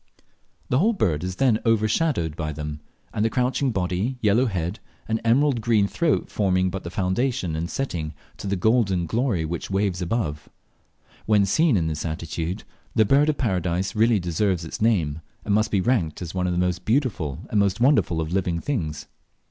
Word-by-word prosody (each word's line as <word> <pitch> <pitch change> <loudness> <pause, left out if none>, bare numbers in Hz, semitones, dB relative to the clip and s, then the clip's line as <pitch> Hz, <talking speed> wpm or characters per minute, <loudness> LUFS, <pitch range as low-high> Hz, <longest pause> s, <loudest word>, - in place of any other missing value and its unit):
The 125 - +3
whole 220 +7 +3
bird 85 - 0
is 90 0 -3
then 120 -1 +3
overshadowed 110 - +1
by 75 -2 -3
them, 75 0 -5 0.4
the 110 +2 +2
crouching 130 +3 0
body, 95 +4 -1
yellow 115 +3 +3
head, 95 0 -3 0.3
and 110 0 -1
emerald 125 +2 +3
green 110 -3 +3
throat 165 +6 0
forming 95 -2 +1
but 95 - -5
the 85 - -5
foundation 95 0 -1
and 85 +2 -3
setting 85 - -3 0.2
to - - -6
the 100 - 0
golden 95 -3 +2
glory 110 -3 0
which 85 +1 -4
waves 95 -2 0
above. 85 -6 -2 0.8
When 105 -2 +4
seen 150 - +3
in 85 - +1
this 80 -2 -3
attitude, 85 +3 -4 0.3
the 110 -2 +5
Bird 140 +7 +4
of 150 - 0
Paradise 95 -5 -1
really 110 0 +4
deserves 90 0 0
its 80 - -7
name, 85 -9 +1 0.2
and 105 - +1
must 110 +1 +2
be 100 - +1
ranked 90 -8 0
as 85 - -7
one 90 -1 0
of 90 - 0
the - - -2
most 90 0 0
beautiful 110 - 0
and 105 - +2
most 100 0 +1
wonderful 120 - +3
of 80 +2 -4
living 90 -3 0
things. 85 - -3
95 Hz, 180 wpm, -24 LUFS, 85-115 Hz, 0.8 s, the